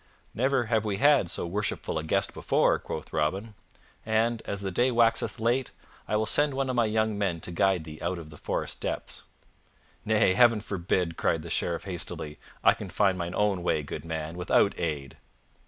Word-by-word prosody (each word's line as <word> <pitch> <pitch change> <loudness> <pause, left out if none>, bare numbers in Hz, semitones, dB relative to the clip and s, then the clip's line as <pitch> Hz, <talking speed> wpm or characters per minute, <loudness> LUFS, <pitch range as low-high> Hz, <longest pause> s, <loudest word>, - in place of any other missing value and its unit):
"Never 130 +2 +2
have 110 -2 +1
we 105 -3 -1
had 140 - +4
so 90 - -2
worshipful 100 -2 -2
a - - -5
guest 80 - 0
before!" - - +2
quoth - - -7
Robin, 95 +9 -1 0.5
"and, 110 +1 +1
as 100 -1 -2
the 95 -1 -3
day 120 +8 +2
waxeth 115 -2 +2
late, 120 +3 +1 0.4
I - - 0
will 110 +1 +2
send 145 +4 +3
one 135 -1 0
of - - -3
my 120 -1 +3
young 110 -1 0
men 90 -5 0
to - - -4
guide 95 0 +2
thee 75 -1 -9
out 95 - -1
of 80 -2 -9
the 75 - -12
forest - - -3
depths." - - -3 0.8
"Nay, 105 -3 +3
Heaven 120 0 +5
forbid!" 90 -4 -1
cried - - 0
the - - -7
Sheriff 85 -1 -1
hastily. 85 -5 -5 0.2
"I - - +7
can 100 - -8
find 95 +1 +2
mine 85 0 -4
own 105 -3 +1
way, 80 -3 0
good 70 - -6
man, 80 0 -4
without 95 +2 +3
aid." 75 -5 -3
100 Hz, 190 wpm, -28 LUFS, 85-115 Hz, 0.8 s, I